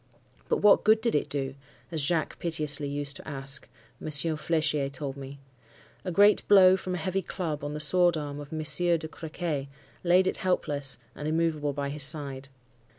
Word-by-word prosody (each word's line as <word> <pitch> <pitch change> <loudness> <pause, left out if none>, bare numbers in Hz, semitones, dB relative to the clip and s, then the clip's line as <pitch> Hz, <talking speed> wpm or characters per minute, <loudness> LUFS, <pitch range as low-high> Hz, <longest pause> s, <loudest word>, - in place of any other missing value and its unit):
But - - 0
what 210 - +5
good 220 +1 +4
did 230 +1 -1
it 150 - -1
do? 135 -2 -3 0.4
as 160 -2 -2
Jacques 160 +2 -1
piteously 150 -4 +2
used 145 0 -3
to - - -13
ask, 135 -1 -1 0.3
Monsieur 155 +1 +2
Flechier 155 -3 -1
told 135 0 -5
me. 140 0 -9 0.7
A 185 - -4
great 205 +4 +4
blow 190 -2 +7
from 185 -1 -4
a - - -3
heavy 185 +3 -2
club 160 -6 -5
on 145 +1 -5
the - - -4
sword 175 +2 +4
arm 145 -1 -6
of 145 0 -10
Monsieur 160 +2 +2
de 160 -1 -7
Crequy 160 -3 -5 0.4
laid 180 +1 +4
it - - 0
helpless 145 -7 -1 0.2
and 150 - -6
immovable 155 -2 -1
by 140 0 -4
his 150 +1 -2
side. 140 -2 -1
155 Hz, 180 wpm, -27 LUFS, 145-175 Hz, 0.7 s, blow